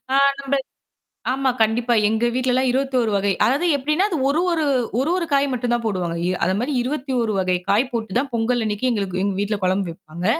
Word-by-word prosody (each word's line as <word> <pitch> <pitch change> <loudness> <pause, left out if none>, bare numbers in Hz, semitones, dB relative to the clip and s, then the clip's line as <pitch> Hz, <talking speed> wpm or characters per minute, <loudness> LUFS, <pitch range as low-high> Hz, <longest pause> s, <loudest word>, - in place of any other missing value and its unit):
ஆ - - +5 0.2
நம்ம 275 0 -2 0.8
ஆமா 265 0 +1
கண்டிப்பா 230 +2 +2 0.2
எங்க 220 +2 +1
வீட்ல 255 0 +1
எல்லாம் 260 0 +2
21 255 -4 0
வகை. 200 0 +1
அதாவது 285 +9 +1
எப்பிடின்னா 305 +9 +1
அது 335 - -1
ஒரு, 310 +4 +1
ஒரு, 320 -2 +1 0.3
ஒரு, 285 +5 0
ஒரு 345 - -1
காய் 280 0 +3
மட்டும்தான் 240 -1 -1
போடுவாங்க. 180 -5 -2 0.2
அ - - -10
அதேமாரி 225 +10 0
21 255 -4 -1
வகை 185 -1 +1
காய் 230 +6 +2
போட்டுத்தான் 235 +4 -1
பொங்கல் 240 +2 +1
அன்னக்கி 210 +4 -1
எங்களுக்கு 190 -4 -2
எங்க 200 -1 0
வீட்ல 205 0 -1
குழம்பு 185 0 +1
வைப்பாங்க. 170 0 -9
240 Hz, 185 wpm, -21 LUFS, 200-270 Hz, 0.8 s, ஆ